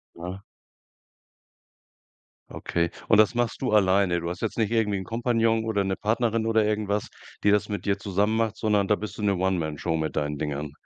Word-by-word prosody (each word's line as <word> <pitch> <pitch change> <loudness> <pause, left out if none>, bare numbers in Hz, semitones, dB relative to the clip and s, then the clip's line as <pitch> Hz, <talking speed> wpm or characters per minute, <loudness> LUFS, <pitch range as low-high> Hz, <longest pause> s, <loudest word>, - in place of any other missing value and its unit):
Ja. 90 +3 -7 2.1
Okay, 85 0 -1 0.2
und 110 - +5
das 110 +2 +5
machst 120 +1 -1
du 130 - 0
alleine? 95 -3 +3
Du 85 - -4
hast 90 +1 -6
jetzt - - -3
nicht 110 -1 +1
irgendwie 105 -3 +1
'n 95 - -5
Kompagnon 115 +1 +1
oder 105 -3 0
'ne 95 0 0
Partnerin 115 +1 0
oder 110 -1 +3
irgendwas, 105 -1 -1 0.4
die 105 - +5
das 105 +1 +2
mit 105 - -4
dir 100 0 +1
zusammen 100 +3 0
macht, 110 -1 0
sondern 105 -3 +1
da 105 - +4
bist 110 +1 -7
du - - -5
'ne 100 -1 +2
One 95 0 +1
Man 80 -2 -3
Show 80 +1 -1
mit 80 -1 -3
deinen 75 0 -1
Dingern. 75 0 -4
105 Hz, 200 wpm, -26 LUFS, 90-110 Hz, 2.1 s, und